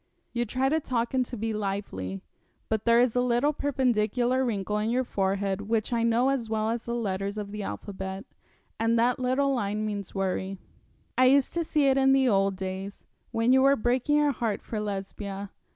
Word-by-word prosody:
'You 240 0 0
try 255 +4 0
to 315 +4 +2
talk 240 -5 -2
and 260 -1 +3
to 245 - -6
be 220 +1 -2
lively, 195 - -4 0.5
but 220 -1 -1
there 235 0 +5
is 245 -1 +3
a 245 - +3
little 250 +4 +2
perpendicular 250 -2 +1
wrinkle 210 -3 -1
in 215 +1 -1
your 250 +2 +1
forehead 195 -3 -1
which 225 +1 0
I 230 - +1
know 235 +3 +3
as 255 -5 -1
well 220 0 0
as 230 0 -3
the 235 - -2
letters 200 -2 -2
of 205 -1 -5
the 210 0 -5
alphabet, 195 0 -5 0.5
and 225 +1 +2
that 245 +2 +2
little 260 +2 +1
line 210 -3 -1
means 205 -2 -5
worry. 195 0 -2 0.6
I 255 - +6
used 270 +1 +4
to 340 - 0
see 300 -2 +1
it 270 0 +4
in 270 0 +5
the 270 -1 +4
old 195 -3 +2
days, 190 +1 -6 0.3
when 230 +2 +1
you 265 - +5
were 275 +1 +5
breaking 250 +4 +1
your 295 -1 +3
heart 230 -5 -2
for 220 - -4
Lesbia. 200 -1 -5
225 Hz, 200 wpm, -27 LUFS, 200-255 Hz, 0.6 s, I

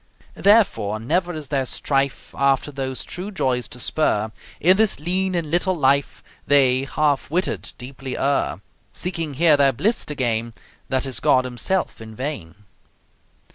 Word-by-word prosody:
Therefore, 115 - +3
never 175 +10 0
is 155 -5 -7
their 135 -2 0
strife 135 +1 -1
After 140 +1 +1
those 135 -2 -4
true 180 +3 -5
joys 130 - -1
to 125 - -8
spur; 110 -6 0 0.3
In 185 +3 +5
this 220 -7 +2
lean 185 +4 0
and 165 -4 -2
little 180 +2 +1
life 140 -1 +1 0.2
They, 135 -2 +4
half 145 -1 0
witted, 180 +5 -2
deeply 130 +1 -7
err 140 +1 0 0.3
Seeking 165 -5 -3
here 160 +1 +5
their 140 -1 +4
bliss 215 - +1
to 150 - -4
gain, 115 -3 -1 0.3
That 130 0 0
is 130 -3 -2
God 130 0 +3
Himself 125 +7 -2
in 110 0 -10
vain. 115 - -5
140 Hz, 150 wpm, -22 LUFS, 130-170 Hz, 0.3 s, In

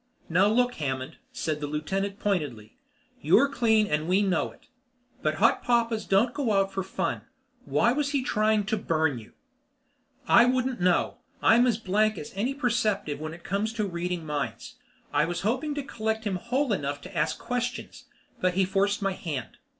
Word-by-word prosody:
"Now 180 +4 +4
look, 245 +3 +2
Hammond," 130 -2 -3
said 155 -1 -3
the 145 - -2
lieutenant 195 +7 -2
pointedly, 145 - -2 0.5
"You're 175 - +5
clean 225 -5 +3
and 155 -3 -1
we 190 +3 +3
know 185 -4 +1
it. - - -21 0.6
But 155 0 0
hot 225 +8 +3
papas 230 -3 +1
don't 220 +5 +3
go 260 -7 0
out 195 -1 +1
for 195 - -1
fun. 190 - -2 0.4
Why 235 - +3
was 285 +2 0
he 280 -3 0
trying 215 -3 +2
to 215 +2 0
burn 160 - 0
you?" 110 - -15 0.9
"I 235 - +7
wouldn't 255 -2 0
know. 180 -1 +2 0.3
I'm 240 +2 +6
as 230 -4 +2
blank 215 0 +1
as 150 - -7
any 240 +8 -1
perceptive 220 - 0
when 155 +1 -5
it 175 - -16
comes 205 +4 -1
to 215 -2 -1
reading 175 -2 -3
minds. 150 -2 -4 0.4
I - - +3
was 175 +1 -3
hoping 260 +8 -1
to 290 - -3
collect 220 -3 -2
him 200 -4 -1
whole 250 +5 0
enough 145 -5 -2
to 185 +3 -11
ask 155 -1 0
questions, 245 +1 -4 0.3
but 180 -1 +1
he 190 0 +3
forced 200 +2 0
my 195 - +1
hand." 145 -10 -5
200 Hz, 180 wpm, -27 LUFS, 165-235 Hz, 0.9 s, I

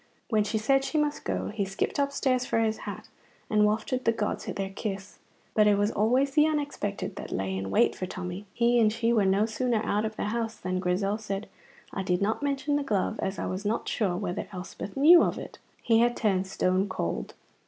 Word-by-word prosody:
When 215 -1 +3
she 210 +1 -1
said 270 +5 +2
she 310 - -2
must 295 -1 0
go, - - -2
he 210 -1 -2
skipped 195 +8 -2
upstairs 275 -2 +1
for 250 - -1
his 220 -1 +2
hat, - - -8 0.4
and 210 -1 +4
wafted 220 +4 -1
the 230 - +4
gods 215 -2 -2
their 195 -1 -3
kiss. 195 -1 -5 0.3
But 215 -1 +4
it 205 -1 +4
was 205 +2 +2
always 250 +7 +2
the 300 +2 +4
unexpected 285 -10 -3
that - - -7
lay 95 0 -2
in 95 0 -3
wait 95 - +3
for 185 - -4
Tommy. 185 +2 -6
He 235 +2 +3
and 215 -2 +4
she 230 +1 +1
were 210 -4 +3
no 195 +3 +3
sooner 230 0 -1
out 210 +1 +1
of 220 0 -3
the 210 - -2
house 230 -1 -2
than 185 -2 -3
Grizel 195 +3 0
said, 205 -1 -4 0.5
"I 195 - -2
did 180 -1 0
not 215 +6 0
mention 285 0 0
the 290 - -1
glove, 210 -8 -1
as 190 +1 -2
I - - -3
was 185 +2 -3
not 215 +2 -1
sure 190 -5 0
whether 180 -2 -3
Elspeth 190 +2 -7
knew 330 +5 +8
of - - +1
it." - - -9 0.2
He 225 -1 +4
had 240 +1 +3
turned 195 -3 +1
stone 190 +1 +1
cold. 85 - -3
215 Hz, 215 wpm, -28 LUFS, 195-240 Hz, 0.5 s, knew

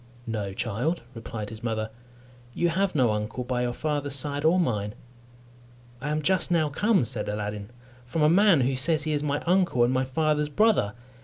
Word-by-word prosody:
"No, 105 -4 -3
child," 120 - -2
replied 115 -2 -6
his 110 0 -9
mother, 110 -2 -2 0.6
"you 175 - +2
have 190 +2 0
no 125 -6 +3
uncle 105 +4 -3
by 125 0 -2
your 120 0 0
father's 145 +1 -2
side 145 +2 -1
or 165 +4 +4
mine." 105 - -1 1.1
"I 150 - -3
am 155 0 -1
just 185 +4 +2
now 160 -3 +2
come," 195 - +2
said 115 -3 -1
Aladdin, 105 0 -4 0.4
"from 155 +5 0
a - - +6
man 185 -2 +5
who 130 +2 +1
says 155 +4 +2
he 155 0 -1
is 145 - 0
my 145 -1 -1
uncle 175 -8 +3
and 120 +2 +2
my 130 0 +1
father's 150 +2 0
brother. 195 - +2
140 Hz, 185 wpm, -26 LUFS, 115-160 Hz, 1.1 s, a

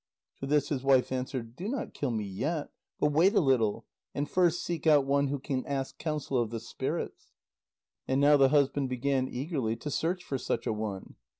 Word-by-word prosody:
To 135 - -4
this 145 0 +2
his 140 -4 -1
wife 135 -2 +3
answered: 125 -2 -4
"Do 180 +8 -5
not 255 +1 -3
kill 140 - -2
me 110 -3 -1
yet, 140 - -3 0.3
but 150 - +2
wait 175 +8 +4
a - - +6
little, 125 - +2 0.3
and 145 +1 -1
first 175 -1 +2
seek 170 -2 -3
out 145 -3 +6
one 140 +1 +2
who 140 +1 -1
can 130 -1 -3
ask 135 -1 -3
counsel 150 -4 -1
of 115 - -2
the 115 0 -4
spirits." - - -5 0.7
And 130 +1 +1
now 145 +1 +6
the 135 -2 +5
husband 140 -1 +2
began 130 +1 0
eagerly 130 -4 -2
to 150 - -6
search 175 +5 -1
for 135 -5 -3
such 115 0 -2
a - - 0
one. 105 -3 -5
140 Hz, 200 wpm, -29 LUFS, 125-150 Hz, 0.7 s, a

